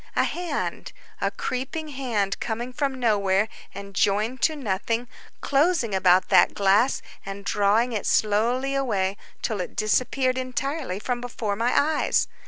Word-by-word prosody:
A -, -, +3 dB
hand, 345 Hz, -4 st, -3 dB, 0.3 s
a -, -, +2 dB
creeping 270 Hz, +5 st, -4 dB
hand 235 Hz, -8 st, -1 dB
coming 240 Hz, +2 st, -3 dB
from 275 Hz, -1 st, -2 dB
nowhere 205 Hz, -3 st, +2 dB, 0.2 s
and 200 Hz, 0 st, -9 dB
joined 210 Hz, +6 st, +1 dB
to 315 Hz, -, +3 dB
nothing, 230 Hz, -1 st, -2 dB, 0.3 s
closing 285 Hz, -, +2 dB
about 185 Hz, -1 st, +4 dB
that -, -, +5 dB
glass 205 Hz, +6 st, +3 dB, 0.2 s
and 195 Hz, 0 st, -7 dB
drawing 210 Hz, +4 st, +2 dB
it 210 Hz, -, -2 dB
slowly 235 Hz, +6 st, +2 dB
away 205 Hz, -8 st, 0 dB, 0.3 s
till 210 Hz, -4 st, -1 dB
it -, -, -6 dB
disappeared 255 Hz, +4 st, +1 dB
entirely 260 Hz, -, -3 dB
from 240 Hz, +3 st, -3 dB
before 230 Hz, -4 st, -3 dB
my 235 Hz, +4 st, +2 dB
eyes! 305 Hz, +1 st, +1 dB
235 Hz, 140 wpm, -25 LUFS, 200-265 Hz, 0.3 s, that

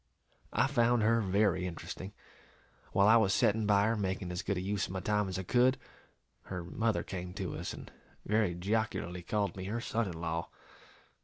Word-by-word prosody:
I 125 Hz, -, +3 dB
found 120 Hz, -4 st, +3 dB
her 115 Hz, +1 st, +4 dB
very 95 Hz, -2 st, +2 dB
interesting; 90 Hz, +2 st, -7 dB, 0.8 s
while 100 Hz, +1 st, +4 dB
I 110 Hz, +2 st, +8 dB
was 100 Hz, -3 st, +3 dB
setting 105 Hz, 0 st, +2 dB
by 100 Hz, -1 st, +4 dB
her, 115 Hz, +1 st, +2 dB
making 95 Hz, -3 st, -2 dB
as 90 Hz, -, -3 dB
good 100 Hz, -, -1 dB
a -, -, 0 dB
use 100 Hz, +2 st, -1 dB
of -, -, -7 dB
my 95 Hz, -, -2 dB
time 105 Hz, +1 st, 0 dB
as 95 Hz, -, -3 dB
I 95 Hz, -, -3 dB
could, 125 Hz, +6 st, +3 dB, 0.7 s
her 90 Hz, -2 st, -5 dB
mother 110 Hz, +6 st, 0 dB
came 90 Hz, -1 st, -6 dB
to -, -, -3 dB
us, -, -, -4 dB
and -, -, -9 dB, 0.3 s
very 105 Hz, -4 st, +2 dB
jocularly 90 Hz, -2 st, -1 dB
called 100 Hz, +1 st, -1 dB
me 95 Hz, -1 st, -6 dB
her 110 Hz, +4 st, -2 dB
son 115 Hz, -3 st, -1 dB
in 85 Hz, -3 st, -6 dB
law. 85 Hz, 0 st, -2 dB
100 Hz, 190 wpm, -32 LUFS, 90-110 Hz, 0.8 s, I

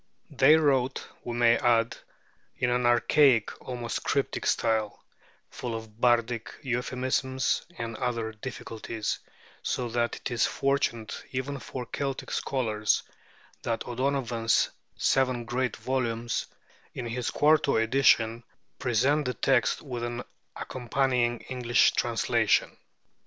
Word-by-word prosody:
They 145 Hz, +2 st, +6 dB
wrote, 135 Hz, -4 st, +1 dB, 0.2 s
we 120 Hz, -, -4 dB
may 120 Hz, -1 st, +5 dB
add, 115 Hz, -1 st, +2 dB, 0.6 s
in 125 Hz, -, +1 dB
an 125 Hz, 0 st, +2 dB
archaic, 120 Hz, 0 st, +4 dB
almost 120 Hz, -2 st, -4 dB
cryptic -, -, -1 dB
style, 110 Hz, -2 st, 0 dB, 0.5 s
full 120 Hz, -2 st, -4 dB
of 110 Hz, 0 st, -9 dB
bardic 120 Hz, -1 st, +1 dB
euphemisms 130 Hz, +1 st, 0 dB
and 115 Hz, -1 st, -4 dB
other 115 Hz, -3 st, -2 dB
difficulties; 110 Hz, -1 st, -5 dB, 0.4 s
so 120 Hz, -1 st, -2 dB
that 120 Hz, 0 st, 0 dB
it -, -, -6 dB
is 120 Hz, -, +2 dB
fortunate 135 Hz, -5 st, -1 dB
even 135 Hz, +2 st, -3 dB
for 125 Hz, -2 st, -6 dB
Celtic 135 Hz, +2 st, -4 dB
scholars 110 Hz, -5 st, 0 dB, 0.6 s
that 115 Hz, -1 st, -2 dB
O'Donovan's 120 Hz, -3 st, +1 dB, 0.3 s
seven 130 Hz, -3 st, +1 dB
great 125 Hz, 0 st, -1 dB
volumes, 120 Hz, -3 st, -2 dB, 0.5 s
in 125 Hz, -, -4 dB
his 120 Hz, 0 st, -2 dB
quarto 150 Hz, -1 st, +3 dB
edition, 115 Hz, -1 st, +3 dB, 0.4 s
present 140 Hz, +4 st, +2 dB
the 125 Hz, -, -2 dB
text 135 Hz, -, +2 dB
with 125 Hz, -5 st, -5 dB
an 120 Hz, +1 st, -3 dB, 0.3 s
accompanying 125 Hz, -1 st, 0 dB
English 120 Hz, -3 st, +2 dB
translation. -, -, +1 dB
120 Hz, 115 wpm, -28 LUFS, 115-130 Hz, 0.6 s, They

